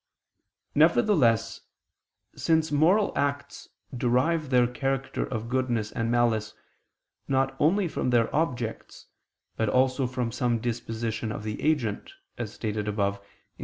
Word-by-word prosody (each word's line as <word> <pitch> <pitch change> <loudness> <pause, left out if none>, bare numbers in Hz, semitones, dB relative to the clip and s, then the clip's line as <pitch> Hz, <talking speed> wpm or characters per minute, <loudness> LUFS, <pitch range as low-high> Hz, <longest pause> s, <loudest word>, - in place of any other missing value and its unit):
Nevertheless, 115 - +3 0.7
since 160 -1 +1
moral 175 +8 +3
acts 140 0 -3 0.3
derive 130 +6 +1
their 125 -2 +4
character 135 +2 -2
of 115 -2 -4
goodness 120 -4 -1
and 115 -1 -2
malice, 115 -3 +1 0.7
not 135 0 +1
only 180 +5 +3
from 155 - -2
their 120 0 +2
objects, 125 -8 -3 0.5
but 110 -2 +1
also 130 +2 +2
from 125 -2 -3
some 120 -1 0
disposition 115 -1 -3
of 105 - -6
the 105 0 -5
agent, 145 - -1 0.2
as 115 -4 -5
stated 105 -2 -3
above 100 -1 -1
(Q. 100 - -26
125 Hz, 125 wpm, -27 LUFS, 115-140 Hz, 0.7 s, their